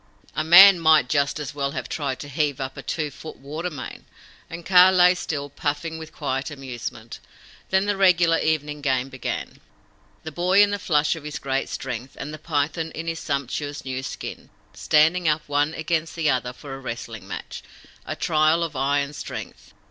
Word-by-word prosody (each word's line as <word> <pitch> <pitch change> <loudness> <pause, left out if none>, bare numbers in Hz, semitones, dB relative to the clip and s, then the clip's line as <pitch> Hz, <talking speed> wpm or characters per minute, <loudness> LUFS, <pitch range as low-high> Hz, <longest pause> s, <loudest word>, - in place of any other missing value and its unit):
A - - 0
man 180 +3 +9
might 155 -5 +5
just, 140 0 +1
as 150 0 -5
well 140 -1 -2
have - - -4
tried 140 -4 -3
to 145 - -7
heave 145 -1 -1
up 135 0 -4
a - - -7
two 155 -3 -3
foot 155 +3 -10
water 155 +6 -5
main; 145 -6 -8 0.4
and 170 0 -8
Kaa 185 0 +7
lay 180 -1 +6
still, 150 -5 -4
puffing 145 +3 -3
with 160 -1 -9
quiet 135 -2 -3
amusement. 120 -5 -7 0.5
Then 190 +1 +2
the 205 0 0
regular 175 -4 +4
evening 150 -2 -1
game 130 -2 0
began 130 -2 -5 0.6
the 160 - -6
Boy 185 +5 +4
in 205 - +1
the 205 - -2
flush 150 -3 +1
of 160 - -10
his 150 0 -5
great 135 0 -2
strength, 125 0 -6
and 150 +2 -6
the 155 - -8
Python 155 +1 -1
in 165 - -5
his 165 0 -3
sumptuous 145 0 -3
new 130 0 -3
skin, 135 - -7 0.2
standing 160 +3 +3
up 150 0 +1
one 145 +2 0
against 160 0 -2
the 160 -3 +2
other 125 -1 -1
for 135 +2 -10
a 135 - -7
wrestling 120 -3 -7
match - - -7 0.4
a - - -5
trial 155 +2 +2
of 160 -3 -4
eye 140 +2 +1
and 140 +1 -5
strength. - - -8
150 Hz, 190 wpm, -24 LUFS, 140-165 Hz, 0.6 s, man